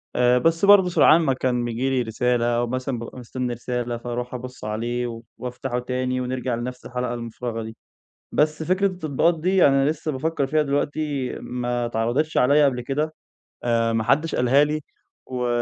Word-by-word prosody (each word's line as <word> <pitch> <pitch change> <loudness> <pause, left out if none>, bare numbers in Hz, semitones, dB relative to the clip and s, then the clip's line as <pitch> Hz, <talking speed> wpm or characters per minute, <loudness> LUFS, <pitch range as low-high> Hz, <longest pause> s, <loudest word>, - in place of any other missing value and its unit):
آآ 125 0 +4
بس 165 +7 +2
برضه 200 -2 +7
سرعان 170 -1 +6
ما 140 -5 +2
كان 125 -2 0
بييجي 120 +3 -1
لي 130 -1 +1
رسالة 120 +1 0
أو 120 0 +1
مثلًا 130 0 -3
بابقى 115 +2 -8
مستنى 125 0 -4
رسالة، 120 0 -3
فأروح 120 +1 -5
أبُص 125 +1 -7
عليه 115 +2 -3 0.2
وأفتحه 125 0 -4
تاني 125 +1 -2
ونرجع 125 -1 -2
لنفس 125 +2 -6
الحلقة 125 -1 -3
المفرغة 115 -1 -5
دي. 110 0 -8 0.6
بس 155 +1 +1
فكرة 185 +4 +2
التطبيقات 165 -2 0
دي 185 +2 +4
أنا 135 +1 +3
لسه 155 0 -3
بافكر 145 +1 -1
فيها 155 +3 +2
دلوقتي 145 -1 -1
ما 120 -1 -2
اتعرضتش 120 +7 -1
عليَّا 145 +4 +5
قبل 130 -3 +1
كده. 145 +5 -2 0.5
آآ 115 -1 +1
ما 115 -1 +1
حدش 145 +8 +1
قالها 130 +4 +4
لي، 150 +1 -1 0.4
و 125 -1 -3
125 Hz, 170 wpm, -23 LUFS, 120-150 Hz, 0.6 s, برضه